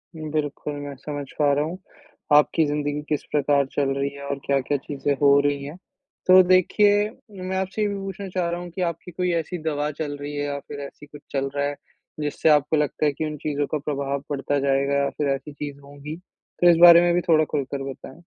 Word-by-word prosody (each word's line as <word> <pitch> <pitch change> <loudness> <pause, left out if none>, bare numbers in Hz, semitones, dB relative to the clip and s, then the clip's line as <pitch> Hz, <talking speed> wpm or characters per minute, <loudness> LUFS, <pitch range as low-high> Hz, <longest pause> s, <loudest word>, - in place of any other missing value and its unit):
बिल्कुल, 150 -2 -3
मैं 145 -1 -6
समझ 145 +1 -6
पा 145 -1 +4
रहा 145 +1 +1
हूँ। 170 +4 -5 0.6
आपकी 150 +2 +5
ज़िंदगी 145 0 -2
किस 150 - -1
प्रकार 145 -1 +2
चल 140 -2 0
रही 140 0 0
है 140 - -10
और 140 0 -3
क्या-क्या 140 +1 +1
चीज़ें 140 +1 -2
हो 140 0 +6
रही 145 -1 0
हैं। 145 +5 -8 0.5
तो 185 0 +9
देखिए 205 +3 +4 0.3
मैं 190 +1 -2
आपसे 190 +3 -2
ये 210 - +2
भी 200 - -3
पूछना 195 0 -6
चाह 180 -2 -1
रहा 170 +1 -3
हूँ 175 - -7
कि 185 - -5
आपकी 170 0 -3
कोई 180 +1 -1
ऐसी 170 +2 -2
दवा 150 -2 -1
चल 145 -2 -3
रही 145 +1 -5
है 145 - -2
या 140 0 -3
फिर 145 - -7
ऐसी 145 - -15
कुछ 145 0 -13
चल 135 0 -1
रहा 140 0 0
है, 145 0 -2 0.4
जिससे 150 +1 0
आपको 150 +1 +3
लगता 150 +1 0
है 150 - +3
कि 155 - -3
उन 150 -1 -4
चीज़ों 145 0 -2
का 155 - +1
प्रभाव 140 -1 -3
पड़ता 145 0 -1
जाएगा? 140 0 +1
या 140 - +1
फिर 145 +2 -3
ऐसी 145 +2 -9
चीज़ 145 -1 -7
होंगी, 145 +2 -9 0.5
तो 175 - +7
इस 170 - +6
बारे 170 -1 +10
में 175 0 +3
भी 175 - +2
थोड़ा 155 -1 +5
खुलकर 140 -2 -3
बताएँ? 135 +4 -12
145 Hz, 220 wpm, -24 LUFS, 140-170 Hz, 0.6 s, बारे